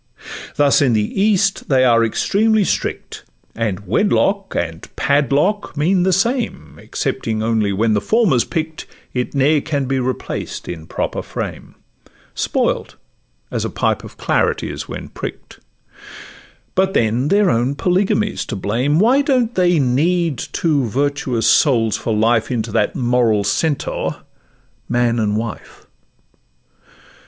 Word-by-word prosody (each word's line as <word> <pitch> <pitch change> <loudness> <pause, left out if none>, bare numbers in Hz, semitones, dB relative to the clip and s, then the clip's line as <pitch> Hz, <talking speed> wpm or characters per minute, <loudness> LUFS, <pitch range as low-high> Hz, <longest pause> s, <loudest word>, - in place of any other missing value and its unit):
Thus 145 +1 +4
in 130 -4 +3
the 110 - 0
East 200 -2 +1
they 130 -2 +4
are 115 -2 +4
extremely 215 - +2
strict, - - -3 0.3
And 105 -3 -3
Wedlock 195 - +1
and 80 0 -3
a - - -11
Padlock 145 - +1
mean 180 +5 +2
the 190 +1 +2
same; 235 +7 -1
Excepting 110 -1 -3
only 110 -3 +1
when 110 +3 +1
the 105 - +1
former 215 - +2
's - - +3
pick'd 160 -1 -4 0.3
It 125 +2 -3
ne'er 145 +2 +3
can 145 -3 -2
be 135 +1 -1
replaced 130 0 -4
in 80 -2 -7
proper - - -3
frame; - - -6 0.6
Spoilt, - - -1 0.6
as - - -2
a - - -2
pipe - - -1
of - - -12
claret - - 0
is - - -5
when - - -7
prick'd: - - -8 1.1
But 190 +1 +1
then 115 +4 +1
their 200 +3 +3
own 120 +4 0
Polygamy 195 +5 +1
's - - -1
to 115 - -4
blame; 120 +10 0
Why 245 +9 +4
don't 255 -5 +1
they 180 -3 +3
knead 150 +3 +1
two 150 -6 0
virtuous 130 -1 -1
souls 115 -7 +3
for 115 - -3
life 110 +1 +2
Into 115 -3 -2
that 105 - 0
moral 120 -4 +2
centaur, 145 +8 -1 0.7
man 120 -1 +1
and 105 -1 0
wife? 110 -1 -6
135 Hz, 140 wpm, -18 LUFS, 115-180 Hz, 1.1 s, Thus